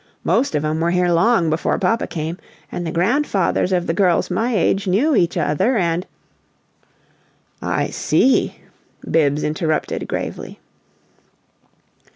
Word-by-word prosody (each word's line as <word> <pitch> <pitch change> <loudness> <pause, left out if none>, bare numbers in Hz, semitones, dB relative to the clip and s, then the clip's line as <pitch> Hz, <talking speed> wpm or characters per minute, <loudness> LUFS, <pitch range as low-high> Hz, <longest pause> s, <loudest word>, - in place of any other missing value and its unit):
Most 260 - +1
of 150 +1 0
'em 155 +1 -1
were 165 +1 +1
here 180 0 +1
long 170 -1 +3
before 160 - 0
papa 230 - 0
came, 165 +3 -5 0.3
and 175 - -4
the - - -3
grandfathers 195 - +1
of 180 -2 +1
the 165 - -1
girls 180 -1 +1
of - - -1
my 235 +1 0
age 195 +1 +1
knew 250 +12 +2
each 175 -3 +1
other, 170 - +1
and 170 -1 -1 0.8
" - - -39 0.2
"I - - -1
see," 265 - +2 0.5
Bibbs 150 -2 +1
interrupted, 155 +1 -2
gravely. - - -5
175 Hz, 140 wpm, -20 LUFS, 165-205 Hz, 0.8 s, long